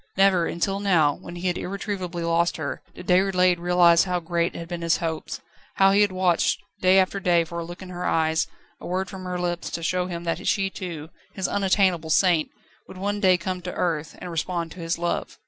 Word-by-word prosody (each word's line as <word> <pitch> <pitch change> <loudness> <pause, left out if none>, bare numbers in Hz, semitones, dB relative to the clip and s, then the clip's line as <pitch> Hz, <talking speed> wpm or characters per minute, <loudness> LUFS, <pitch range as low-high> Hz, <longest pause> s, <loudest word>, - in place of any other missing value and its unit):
Never 190 -3 +4
until 195 +4 -1
now, 170 -8 +3
when 175 - -10
he 175 +1 -6
had 180 -1 0
irretrievably 185 -3 -4
lost 170 +1 +1
her, 145 -3 -4
did - - -10
Déroulède 180 -1 +3
realise 175 -1 +5
how 180 -1 -1
great 170 0 -1
had 170 - -6
been 175 0 -5
his 165 0 +2
hopes; 165 -2 -4 0.3
how 195 0 +5
he 200 +1 +4
had 205 -2 +3
watched 185 -2 +1 0.2
day 185 +1 +5
after 190 +1 +2
day 175 -3 +3
for 170 +1 -6
a - - -3
look 175 +3 -9
in 185 - -10
her 180 0 -6
eyes, 160 -1 +1 0.3
a - - -8
word 185 +2 -2
from 190 -1 -8
her 180 0 -3
lips, 175 -1 -2
to 170 - -5
show 180 +2 0
him 170 -2 -5
that 165 -1 -3
she 195 -1 +1
too 165 -5 -6 0.3
his 190 - -1
unattainable 190 -4 +1
saint 170 -1 +3 0.4
would - - -11
one 205 +2 -2
day 185 -3 +4
come 185 +1 -4
to 180 0 -6
earth, 160 -3 -2
and 180 - -7
respond 170 0 -2
to 185 - -11
his 165 0 -2
love. 175 0 -3
180 Hz, 215 wpm, -24 LUFS, 170-185 Hz, 0.4 s, realise